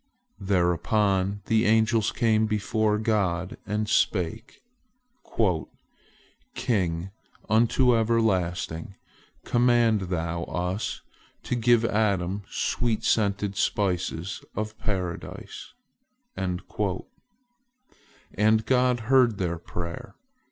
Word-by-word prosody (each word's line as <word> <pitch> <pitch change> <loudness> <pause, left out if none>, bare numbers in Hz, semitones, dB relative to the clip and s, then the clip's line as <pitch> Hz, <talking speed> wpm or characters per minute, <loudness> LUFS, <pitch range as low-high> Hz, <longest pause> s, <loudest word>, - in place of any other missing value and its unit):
Thereupon 95 +1 +1
the 110 0 +2
angels 110 0 +3
came 110 -1 +2
before 105 0 0
God, 95 -5 -1
and 105 +1 -1
spake: 90 -5 -1 1.9
"King 95 -6 -1 0.4
unto 120 +3 +3
everlasting, 95 -6 0 0.5
command 120 -3 +3
Thou 85 -1 -2
us 90 +3 -3 0.4
to - - -3
give 120 -1 +3
Adam 100 -3 0
sweet 115 -3 -1
scented 100 -2 +1
spices 95 -3 -1
of 110 +1 -3
Paradise," 90 -5 -5 0.6
and 90 -1 -3 2.0
God 125 -1 +2
heard 120 -2 +3
their 85 -3 -2
prayer. 90 +7 -7
105 Hz, 80 wpm, -26 LUFS, 90-110 Hz, 2.0 s, angels